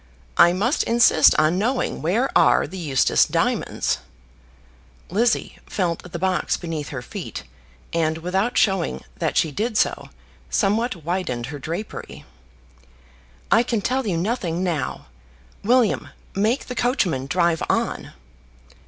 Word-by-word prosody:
"I 175 - +7
must 215 - +1
insist 230 -9 +5
on 155 +4 +3
knowing 245 +5 -1
where 215 - 0
are - - +5
the 185 +5 -8
Eustace 140 -6 +3
diamonds." - - 0 1.1
Lizzie 225 +5 0
felt 180 -2 -2
the 175 - -4
box 185 +1 0
beneath 160 -4 -5
her 130 -4 -6
feet, - - -7 0.5
and, 160 -1 +1
without 190 +8 -1
showing 190 -4 +1 0.2
that 160 -2 -1
she 160 - +2
did 220 - -2
so, - - 0 0.4
somewhat 210 - 0
widened 170 -9 -2
her 145 - -6
drapery. 170 +10 -6 1.3
"I 225 - +6
can 235 -3 -1
tell 255 +3 -1
you 175 -4 0
nothing 185 -3 -1
now. 170 -5 -2 0.6
William, 240 0 +2 0.2
make 220 +7 0
the 250 - -5
coachman 190 - 0
drive 170 0 +1
on." - - -1
185 Hz, 125 wpm, -22 LUFS, 165-225 Hz, 1.3 s, I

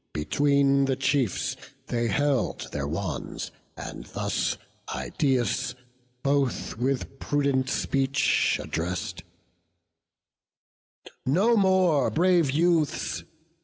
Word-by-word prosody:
Between 140 - +3
the 135 -1 +1
chiefs 135 -5 0 0.3
they 120 -1 -1
held 135 +4 0
their - - -2
wands, - - -4 0.3
and - - -7
thus - - -1 0.3
Idaeus 125 -7 0 0.5
both 140 -2 0
with 135 +2 -2
prudent 140 -2 +1
speech 135 +1 +1
address'd: 90 +2 -3 2.0
"No 195 - +3
more, 185 - +4
brave 175 -2 +3
youths! 160 +1 +1
140 Hz, 85 wpm, -26 LUFS, 130-150 Hz, 2.0 s, more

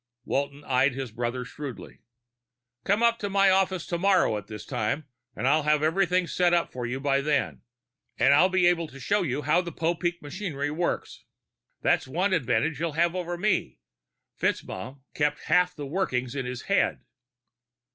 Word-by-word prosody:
Walton 140 +1 -2
eyed 130 0 +2
his 130 -3 -5
brother 120 +2 -3
shrewdly. 135 -1 -8 0.8
"Come 205 +4 +2
up 235 0 +3
to 205 - -3
my 195 0 +4
office 190 -2 +1
tomorrow 180 - +2
at 105 -2 -6
this 105 -1 -8
time. 125 +8 -2 0.3
I'll 140 +8 +3
have 150 0 +2
everything 180 +2 +2
set 175 0 +2
up 170 - 0
for 125 -1 -4
you 130 +2 -3
by 140 0 +1
then, 145 0 0 0.6
and - - +5
I'll 185 - +5
be 185 -1 +2
able 170 -2 +3
to 135 -2 -13
show 205 +9 +1
you 145 -4 -2
how 155 +5 +3
the 175 -1 -6
Popeek 170 +1 -1
machinery 145 -3 -4
works. 170 +3 -3 0.6
That's - - +2
one 180 +8 0
advantage 145 0 +1
you'll 165 -2 -2
have 170 +2 +2
over 175 -1 -3
me. 190 - 0 0.6
FitzMaugham 130 +8 -3
kept 150 0 0
half 180 0 +2
the 145 - -6
workings 130 -6 -1
in 135 -3 -3
his 125 -1 -5
head." - - +1
155 Hz, 165 wpm, -27 LUFS, 135-180 Hz, 0.8 s, and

